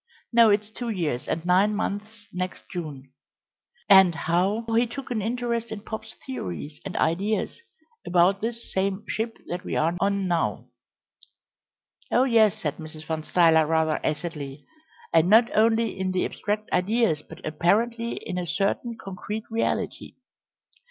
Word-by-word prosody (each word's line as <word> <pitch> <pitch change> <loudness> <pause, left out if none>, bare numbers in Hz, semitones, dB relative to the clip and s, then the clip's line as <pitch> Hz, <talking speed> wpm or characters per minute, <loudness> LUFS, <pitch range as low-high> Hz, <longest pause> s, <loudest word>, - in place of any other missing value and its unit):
No, 230 -1 +7
it's 210 +1 +1
two 240 +1 -5
years 165 - -2
and 165 +1 -2
nine 190 +4 +3
months 210 +1 -4
next 185 0 -4
June; 145 -7 -6 0.8
and 190 -3 +7
how 185 +7 0
he 235 +1 +3
took 270 +2 -7
an 225 -3 0
interest 235 +1 -2
in 215 - -5
Pop's 220 +1 -7
theories 150 - -6
and - - -5
ideas 205 - 0 0.4
about 180 +3 +3
this 235 +1 -4
same 195 +2 0
ship 225 +1 -3
that 180 +1 -5
we - - -4
are 165 +3 +1
on 200 -1 +1
now 170 -2 0 0.7
" - - -40
"Oh 245 - +4
yes," 225 -6 +4
said 150 -1 -3
Mrs. 155 -1 -9
Van 160 -1 -2
Stuyler 160 -1 +4
rather 160 -1 +1
acidly, 150 -3 -4 0.5
"and 165 +1 +4
not 230 +3 +5
only 225 -1 +2
in 190 0 -1
the 185 - +1
abstract 210 +1 -3
ideas, 205 -4 +2
but - - -12
apparently 225 +10 +1
in 180 - -3
a 175 - -4
certain 200 - -1
concrete 200 +3 -5
reality." 225 - -2
195 Hz, 150 wpm, -25 LUFS, 165-225 Hz, 0.8 s, No